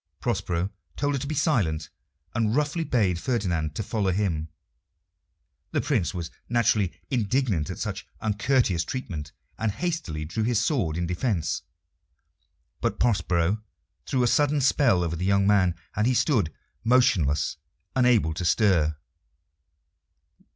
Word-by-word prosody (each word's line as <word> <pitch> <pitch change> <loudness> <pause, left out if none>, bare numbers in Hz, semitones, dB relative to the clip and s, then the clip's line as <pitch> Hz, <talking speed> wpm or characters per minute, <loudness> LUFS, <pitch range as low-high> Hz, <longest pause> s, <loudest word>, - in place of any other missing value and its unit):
Prospero 95 -5 -1 0.3
told 145 0 0
her 140 - 0
to 140 - -4
be 155 - -2
silent, 95 - +1 0.4
and 110 -1 +1
roughly 150 +3 +1
bade 100 - +1
Ferdinand 85 - -1
to 110 - -2
follow 100 -2 -1
him. 90 -5 0 1.3
The - - +2
Prince 110 - 0
was 85 -4 -5 0.2
naturally 110 -5 +2 0.2
indignant 115 - +1
at - - -5
such - - -4
uncourteous 105 -4 +1
treatment, 80 - -5 0.3
and 110 -1 +1
hastily 100 - -3
drew 85 +8 -3
his 115 0 +2
sword 100 - 0
in 85 - -1
defiance. 90 -2 -1 1.2
But - - -1
Prospero 95 -3 +1 0.5
threw 130 -2 +1
a - - +3
sudden 145 +3 +3
spell 130 -9 +3
over 85 -1 -2
the 85 - -4
young 100 +1 +3
man, 95 -4 +3 0.2
and 105 +2 +2
he 130 - +2
stood 110 - +2 0.3
motionless, 105 - +3 0.4
unable 125 -10 +3
to 85 - -4
stir. 85 -6 +3
105 Hz, 135 wpm, -26 LUFS, 85-125 Hz, 1.3 s, a